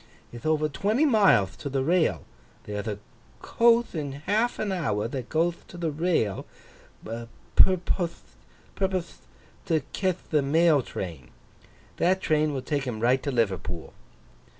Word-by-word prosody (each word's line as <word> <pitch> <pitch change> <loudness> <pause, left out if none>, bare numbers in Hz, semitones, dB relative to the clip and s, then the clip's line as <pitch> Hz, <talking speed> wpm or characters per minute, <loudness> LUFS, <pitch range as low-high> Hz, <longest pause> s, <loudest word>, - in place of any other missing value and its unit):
Ith 120 +6 -6
over 155 -1 +2
twenty 215 - +1
mileth 195 - +4
to 140 - -4
the 135 -1 0
rail. 170 +3 +2 0.4
There'th 105 +1 -5
a 105 -2 -2 0.4
coath 235 0 +3
in 145 -5 -3
half 210 - 0
an 210 -2 -2
hour, 140 - -1
that 125 0 -5
goeth 170 +2 0
to 175 - -11
the 165 -2 -1
rail, 150 - 0 0.6
'purpothe 170 - +1 1.5
to 160 -2 +2
cath 185 -3 -2
the 150 -2 +3
mail 155 +1 +4
train. 85 - -7 0.7
That 185 +2 +2
train 155 -3 +1
will 135 -3 -4
take 140 0 -1
him 120 -4 -4
right 125 +3 +3
to 145 - -3
Liverpool. 95 - -2
150 Hz, 135 wpm, -26 LUFS, 120-175 Hz, 1.5 s, mileth